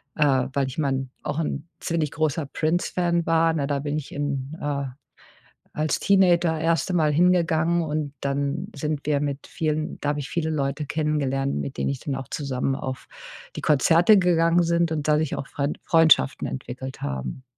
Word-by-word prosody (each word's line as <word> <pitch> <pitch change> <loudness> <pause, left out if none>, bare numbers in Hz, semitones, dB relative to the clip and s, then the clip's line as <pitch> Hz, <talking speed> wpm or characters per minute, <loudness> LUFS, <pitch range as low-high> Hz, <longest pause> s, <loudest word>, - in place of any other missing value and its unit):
äh, 135 -4 +3
weil 140 -1 +1
ich 130 - -7
mein 135 -3 -1
auch 145 - -2
'n 150 -1 -3
ziemlich 165 -3 -1
großer 155 0 -1
Prince-Fan 170 +2 0
war, 165 0 +3
ne? 145 -3 -1
Da 145 -1 0
bin 145 +1 -2
ich 150 - -6
in 145 +1 -3
äh, 140 -1 -2 0.9
als 155 0 0
Teenager 175 -4 +3
erste 165 +3 +1
Mal 155 -3 +3
hingegangen 170 0 +3
und 150 -2 -3
dann 140 +6 -2
sind 150 -2 -2
wir 145 -2 +2
mit 140 -1 -3
vielen 155 -1 -2
da 145 - 0
habe 145 0 -1
ich 140 - -6
viele 160 -2 -1
Leute 145 -1 -2
kennengelernt, 140 -3 -1
mit 140 - -4
denen - - 0
ich 140 - -3
dann 140 - -3
auch 135 -2 -7
zusammen 135 -2 -2
auf 130 -1 -6 0.5
die - - -3
Konzerte 165 +7 +5
gegangen 170 -1 +3
sind 170 0 +1
und 150 -1 -2
dadurch 150 -1 +2
auch 140 - -6
Friend 140 +1 -2
Freundschaften 165 -4 +4
entwickelt 130 0 -7
haben. 65 - -4
150 Hz, 175 wpm, -24 LUFS, 140-165 Hz, 0.9 s, Konzerte